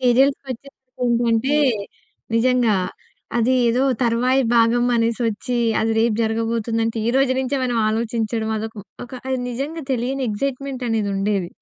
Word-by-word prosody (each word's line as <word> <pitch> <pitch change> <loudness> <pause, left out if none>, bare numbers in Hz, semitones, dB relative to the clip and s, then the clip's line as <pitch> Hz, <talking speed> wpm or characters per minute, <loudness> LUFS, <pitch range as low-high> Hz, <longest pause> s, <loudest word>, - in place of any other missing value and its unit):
సీరియల్స్‌కి 265 +3 +3
వచ్చేసరికి 255 0 -11
ఏంటంటే 235 +3 +2 0.8
నిజంగా 240 -2 +3 0.6
అది 235 +3 +2 0.2
ఏదో 245 +3 +2 0.2
తర్వాయి 250 +3 +2
భాగం 230 +1 +4
అనేసి 230 +1 0
వచ్చి. 230 +3 -2 0.2
అది 225 +1 +1
రేపు 230 -1 +2
జరగబోతుందంటే 225 0 -1
ఈరోజు 265 +2 +3
నుంచే 265 +2 -1
మనం 245 -2 -1
ఆలోచించడం 225 0 -1
అదొక 220 +1 -6 0.3
ఒక 245 - -16 0.2
అది 260 - 0
నిజంగా 285 +7 -4
తెలియని 260 +2 -1
ఎక్సైట్‌మెంట్ 270 +3 -3
అనేది 220 -2 0
ఉండేది 195 -2 0
235 Hz, 130 wpm, -21 LUFS, 225-255 Hz, 0.8 s, భాగం